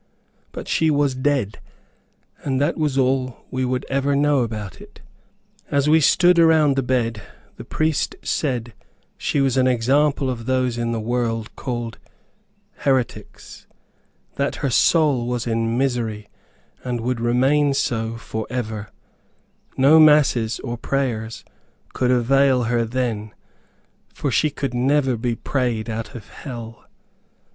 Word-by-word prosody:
But - - -8
she 160 - +2
was 145 -2 +2
dead; 130 -6 -1 0.8
and 135 -2 -1
that 145 - +1
was 150 -4 -1
all 130 -1 0
we 130 0 -1
could 125 +1 -1
ever 140 +1 0
know 145 0 +3
about 110 -5 -4
it. - - -15 0.7
As 140 0 +1
we 160 +1 +5
stood 175 +3 +4
around 160 -4 +5
the 135 - +1
bed, 120 -4 -1 0.4
the - - -8
priest 155 -2 -1
said 120 -6 -2 0.4
she 145 - -1
was 135 -2 +1
an 130 0 +4
example 135 +4 +2
of 115 -3 -4
those 130 -2 +1
in 120 0 -2
the 115 - -2
world 115 -1 -2
called 120 -3 -5 0.8
heretics; 130 -3 -3 0.7
that 140 0 -1
her 135 - 0
soul 140 -3 +3
was 120 -1 -2
in 115 0 -1
misery, 115 -5 -2 0.5
and 125 -2 -3
would 120 0 -2
remain 135 +5 +2
so 115 -4 -1
forever; 110 -1 -5 0.9
no 140 +4 +6
masses 140 -7 +4
or 120 0 -5
prayers 115 -6 -2 0.5
could 125 - 0
avail 130 +1 +3
her 115 0 0
then, 115 -3 -3 0.8
for 140 - -2
she 155 +6 +2
could 140 -3 -4
never 135 +1 +2
be 115 +1 -2
prayed 120 -4 -2
out 110 +2 -5
of 110 -4 -9
hell. 115 -5 -9
125 Hz, 135 wpm, -21 LUFS, 115-140 Hz, 0.9 s, no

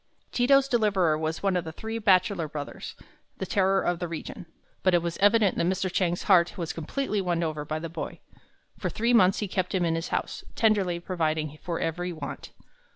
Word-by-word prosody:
Ti 245 0 +1
to's 275 0 +5
deliverer 200 - +2
was 160 +2 -3
one 195 -2 +2
of 180 - 0
the 160 - -6
three 220 +7 -5
bachelor 185 -4 +3
brothers, 145 -1 -7 0.4
the 190 - -3
terror 195 0 +2
of 175 -1 0
the 175 - -2
region. 170 +1 -7 0.3
But 185 -2 +3
it 170 - +2
was 170 -1 -3
evident 205 -1 +4
that 170 - +2
Mr. 185 0 0
Chang's 175 -2 0
heart 180 -3 +4
was 170 -3 -3
completely 210 - -2
won 175 -2 0 0.3
by 155 +1 -3
the 165 +1 -5
boy. 165 +1 -6 0.6
For - - -1
three 235 +2 0
months 195 -4 +5
he 210 - -1
kept 185 0 -2
him 180 -2 +2
in 165 - +1
his 165 +1 -2
home, - - 0 0.3
tenderly 200 -6 +2
providing 155 -4 -2
for 170 -2 -3
every 175 +2 -2
want. 155 -4 -7
180 Hz, 200 wpm, -27 LUFS, 165-200 Hz, 0.6 s, to's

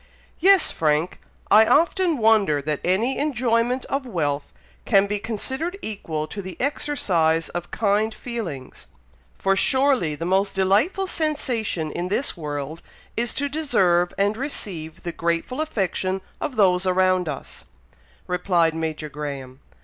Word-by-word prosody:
"Yes, 385 0 +5
Frank, 155 +2 0 0.3
I 215 +2 +8
often 335 - +3
wonder 215 - +3
that 150 +1 -2
any 215 +9 +1
enjoyment 250 -3 +1
of 275 0 -2
wealth 150 - -2 0.3
can 195 0 +4
be 205 +1 -2
considered 265 - -3
equal 160 -8 -3
to 200 - -5
the 185 -1 -8
exercise 175 - +1
of 175 0 -5
kind 210 +1 +1
feelings, 205 - -7 0.5
for 195 0 +2
surely 260 - +2
the 165 - -5
most 195 +2 +1
delightful 210 - +2
sensation 250 - -2
in 175 +3 -3
this 225 +9 -1
world 150 0 -5 0.3
is, 235 +1 0
to 285 - 0
deserve 185 - +2
and 205 +2 +1
receive 185 - -5
the 175 - -3
grateful 170 - -1
affection 195 - -1 0.2
of 265 - -3
those 185 -3 +3
around 185 -2 +2
us," 140 - -8 0.6
replied 180 -2 +1
Major 160 -1 -3
Graham. 140 -3 -6
195 Hz, 135 wpm, -23 LUFS, 165-250 Hz, 0.6 s, I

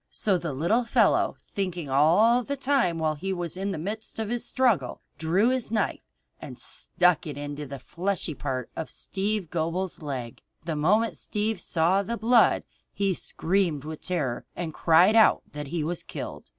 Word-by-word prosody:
So 195 -4 0
the 170 -3 -3
little 170 - +1
fellow 230 - +3 0.2
thinking 180 -5 -3
all 170 - +4
the 280 +3 -4
time 265 -11 +1
while 160 -1 0
he 190 +6 -4
was 175 -3 -3
in 195 +2 -3
the 195 - -3
midst 210 +7 -5
of 220 -2 -3
his 240 0 -1
struggle, 250 -7 +1 0.2
drew 180 +9 +2
his 255 -2 0
knife 215 -2 -1 0.4
and - - -9
stuck 180 -3 +1
it 145 -2 -6
into 145 0 -5
the 140 +1 -6
fleshy 175 +4 -2
part 130 -3 -4
of 160 - -4
Steve 200 -3 -3
Gobel's 170 +2 -2
leg. 130 -6 -5 0.2
The 165 -2 -2
moment 210 +10 +2
Steve 215 +1 -2
saw 175 +3 +2
the 235 +4 -3
blood 230 +2 +4 0.3
he 195 -1 0
screamed 170 -4 0
with 155 0 -7
terror 145 -10 -2
and 165 -3 -4
cried 175 +8 +5
out 220 -1 +5
that 150 -1 -6
he 160 +1 -2
was 170 +2 -2
killed. - - -8
180 Hz, 175 wpm, -26 LUFS, 155-210 Hz, 0.4 s, cried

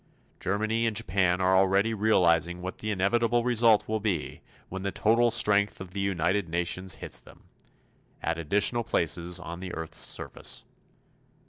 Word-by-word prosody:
Germany 110 +4 0
and 110 - -2
Japan 90 -4 +1
are 95 +1 +3
already 95 +3 +3
realizing 90 -5 +2
what 95 - -6
the 110 - -4
inevitable 115 +4 +1
result 115 -3 +3
will 110 0 -1
be 100 -7 -3 0.3
when 95 +1 -6
the 100 0 -2
total 115 +5 +3
strength 105 -3 +2
of 95 -2 -9
the 100 - -5
United 95 -1 0
Nations 90 +2 -1
hits - - -3
them - - -18 0.8
at 85 +1 -2
additional 105 +8 +1
places 85 -1 0
on 85 -1 -7
the 90 -1 -6
earth's 80 -1 -3
surface. - - -1
95 Hz, 150 wpm, -27 LUFS, 90-110 Hz, 0.8 s, are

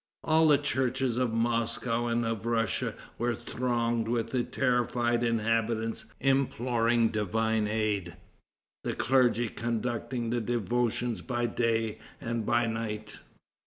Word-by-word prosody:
All 160 0 +4
the 150 -2 +6
churches 130 -3 0
of 125 -3 +1
Moscow 115 +1 0
and 120 0 +1
of 115 0 -2
Russia 115 -3 0 0.2
were 120 0 +1
thronged 120 -1 -1
with 115 0 -1
the 125 -2 +1
terrified 120 -2 +1
inhabitants 115 -1 0
imploring 120 -4 +2
divine 110 +1 0
aid, 105 -5 -1 0.7
the - - -2
clergy 120 -2 +3
conducting 120 +1 -2
the 120 0 0
devotions 120 +1 -1
by 120 -2 -1
day 115 -2 0 0.2
and 115 -2 -3
by 120 0 +3
night. 110 -2 -4
115 Hz, 120 wpm, -29 LUFS, 115-120 Hz, 0.7 s, the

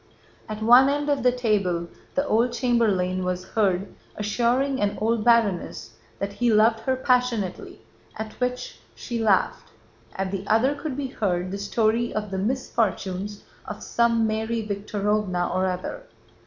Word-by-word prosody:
At 215 0 -5
one 245 +4 +7
end 290 +1 -1
of 285 -1 +1
the 250 - +4
table, 200 -8 0 0.3
the 280 - +1
old 235 0 +2
chamberlain 210 -8 +1
was 180 0 -3
heard 195 -3 0 0.2
assuring 245 +5 0
an 205 0 0
old 225 0 +1
baroness 225 -6 +1 0.3
that 200 0 -4
he 240 +2 +1
loved 220 +1 +4
her 260 +4 0
passionately, 250 -7 -1 0.3
at 220 0 -5
which 250 0 -3 0.2
she 235 -2 -5
laughed; 205 -4 +1 0.5
at 190 -1 -2
the 195 -1 -3
other 240 +6 +3
could 285 -2 -5
be 285 - -2
heard 185 -6 -1
the 200 - -4
story 225 +3 +1
of 210 -2 -3
the 190 - -2
misfortunes 205 -4 -2 0.2
of - - -7
some 230 -1 +2
Mary 220 +1 -1
Víktorovna 200 -3 -1
or 185 +1 +1
other. 185 - -4
220 Hz, 150 wpm, -24 LUFS, 195-240 Hz, 0.5 s, one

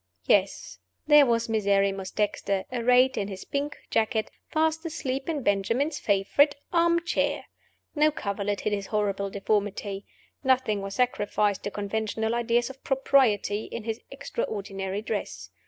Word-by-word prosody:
Yes, 195 -1 +1 0.3
there 295 -2 +7
was 230 0 +1
Miserrimus 200 -3 +1
Dexter, 200 -2 -1
arrayed 250 +2 +3
in 200 - -2
his 190 -2 -7
pink 285 +1 -3
jacket, 220 0 0 0.2
fast 320 +1 +1
asleep 275 -4 -3
in 295 -5 -2
Benjamin's 230 +10 0
favorite 210 +9 +3 0.2
arm 340 0 +3
chair! - - 0 0.5
No 305 0 +4
coverlet 200 -7 -3
hid 215 - -1
his 200 -1 -3
horrible 200 -2 -1
deformity. 200 0 -2 0.4
Nothing 255 -6 +2
was 195 0 -5
sacrificed 210 -5 0
to - - -1
conventional 220 +2 -2
ideas 240 +1 +1
of 265 - -18
propriety 245 -6 +2
in 230 - -6
his 225 0 -4
extraordinary 195 - -4
dress. 215 -1 -4
220 Hz, 135 wpm, -27 LUFS, 200-265 Hz, 0.5 s, there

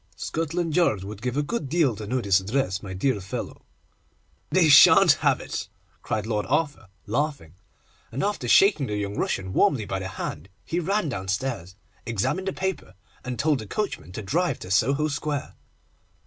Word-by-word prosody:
'Scotland 165 0 -2
Yard 110 - +2
would 105 +1 -8
give 125 +2 -2
a 145 - +2
good 145 - -3
deal 150 -7 +2
to 105 0 -7
know 130 +4 0
this 100 -5 +3
address, 100 -1 -1
my 100 - -8
dear 100 +3 0
fellow.' 95 - -6 0.9
'They 185 -3 +4
shan't 145 -2 +8
have - - +3
it,' - - -5 0.3
cried 105 -1 -2
Lord 105 -2 -2
Arthur, 145 -6 0 0.2
laughing; 130 - -2 0.6
and 130 +5 -3
after 200 -11 -1
shaking 175 - +5
the 105 - -2
young 100 0 -3
Russian 95 -2 -2
warmly 115 +1 +2
by 95 -1 -3
the 95 - -4
hand 85 -2 -6 0.2
he 170 - -1
ran 195 +2 0
downstairs, 95 -2 -3 0.3
examined 115 - -2
the 195 - -1
paper, 190 - -4 0.3
and 125 -1 -4
told 150 -2 +1
the 110 - -8
coachman 205 - -3
to 110 - -6
drive 170 - 0
to 90 - -7
Soho 140 +10 +2
Square. 145 -1 -3
125 Hz, 175 wpm, -25 LUFS, 100-155 Hz, 0.9 s, shan't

